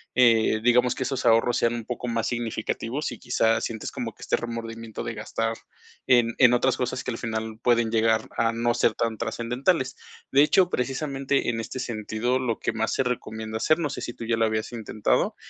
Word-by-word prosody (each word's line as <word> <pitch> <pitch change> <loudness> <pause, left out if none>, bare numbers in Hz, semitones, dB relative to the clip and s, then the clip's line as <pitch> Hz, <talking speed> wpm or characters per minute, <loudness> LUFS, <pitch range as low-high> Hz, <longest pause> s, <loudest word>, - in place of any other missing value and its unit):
eh, 115 -3 +4
digamos 125 +1 +4
que - - -2
esos 130 -1 -3
ahorros 115 +1 +4
sean 115 - +2
un 115 -2 -5
poco 125 +1 -4
más 115 -1 -1
significativos 120 +3 -3
y - - -9
quizás 115 -2 +2
sientes 110 -2 -5
como - - -5
que - - -20
este - - +1
remordimiento 115 -1 -6
de 115 - -4
gastar 115 +1 -2 0.5
en 120 -2 +4
en 125 -2 +7
otras 125 +1 +2
cosas 125 0 -2
que - - -3
al 115 - -4
final 110 -1 -4
pueden 120 -2 +2
llegar 110 -1 +2
a 115 - +2
no 120 +1 +1
ser 120 -2 +3
tan 115 -1 -2
trascendentales. 125 +6 -1 0.4
De 140 - +6
hecho, 180 +4 +4
precisamente 135 0 -1
en 115 -1 -1
este 115 +3 -5
sentido, 120 +1 -1
lo 120 -3 -2
que - - -1
más 115 0 -1
se - - +1
recomienda 110 -3 -4
hacer, 155 +8 +2
no 150 - -1
sé, - - -5
si 120 - -5
tú 115 - -7
ya 115 0 +1
lo 115 - +3
habías 110 +1 -2
intentado, 110 -2 0
115 Hz, 205 wpm, -25 LUFS, 115-125 Hz, 0.5 s, en